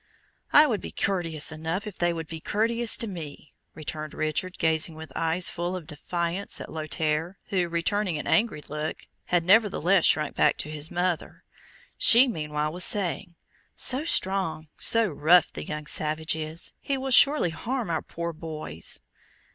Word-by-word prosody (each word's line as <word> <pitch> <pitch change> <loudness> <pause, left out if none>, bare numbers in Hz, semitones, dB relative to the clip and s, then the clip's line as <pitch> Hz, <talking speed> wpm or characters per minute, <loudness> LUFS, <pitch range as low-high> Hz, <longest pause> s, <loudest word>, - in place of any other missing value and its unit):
"I 295 - +7
would 230 -8 -1
be - - -7
courteous 165 -6 0
enough, 160 +5 -4
if 210 -3 -9
they 175 0 +2
would 165 -1 -5
be 160 +1 -8
courteous 230 +4 +2
to - - -2
me," 160 -7 -8 0.2
returned 155 0 -6
Richard, 155 +4 -2
gazing 160 0 0
with 160 0 -10
eyes 165 +2 +1
full 175 +2 -3
of 180 -4 -7
defiance 170 +4 -3
at - - -8
Lothaire, 155 +2 -2
who, 180 -3 0
returning 175 +1 -1
an 150 - -5
angry 210 -9 +1
look, 150 +1 -5 0.2
had 175 -1 +1
nevertheless 195 -2 +3
shrunk 150 -2 +2
back - - +2
to 150 - -4
his 155 +1 -4
mother. 175 -1 -3 0.6
She 245 +4 +7
meanwhile 150 -7 -3
was 180 +1 +2
saying, 175 -3 +1 0.4
"So 260 +3 +2
strong, 190 - 0
so 230 -1 +3
rough, 170 +1 +3
the - - -7
young 150 0 -5
savage 155 +1 +1
is, 160 +1 -4
he 275 - -2
will 265 0 -4
surely 275 - +6
harm 235 +3 -3
our 160 - -1
poor 170 0 -6
boys!" 155 - -5
170 Hz, 165 wpm, -26 LUFS, 155-195 Hz, 0.6 s, I